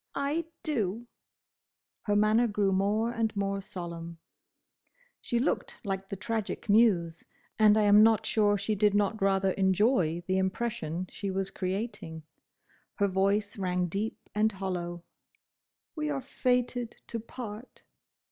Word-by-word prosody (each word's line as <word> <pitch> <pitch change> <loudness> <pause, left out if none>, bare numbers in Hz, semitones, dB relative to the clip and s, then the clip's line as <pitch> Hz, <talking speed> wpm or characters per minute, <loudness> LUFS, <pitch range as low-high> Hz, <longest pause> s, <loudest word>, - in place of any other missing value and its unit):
"I 290 +4 -1 0.2
do!" 230 - -1 1.0
Her 205 - +1
manner 215 +3 +4
grew 205 -2 +1
more 205 +4 +1
and 225 -2 -1
more 200 0 -1
solemn. 170 -3 -7 1.0
She 240 - -1
looked 250 +6 -1
like 195 -2 -3
the - - -3
Tragic 215 +2 -3
Muse, 195 -7 +3 0.4
and 215 0 +6
I 215 - +4
am 205 0 +7
not 220 0 +4
sure 205 -2 +3
she 200 +2 -1
did 210 0 +2
not 205 +1 +1
rather 195 -1 +2
enjoy 190 -3 +2
the 185 +1 +1
impression 190 -3 -2
she 200 - -4
was 195 0 -2
creating. 185 -4 -4 0.7
Her 200 - +2
voice 200 +2 0
rang 180 -1 0
deep 205 +5 -3 0.2
and 215 +1 +2
hollow. 175 -3 -4 0.9
"We 305 -1 -2
are 285 -2 -1
fated 250 -2 -1
to 230 - -5
part." 230 0 -9
205 Hz, 135 wpm, -29 LUFS, 190-225 Hz, 1.0 s, am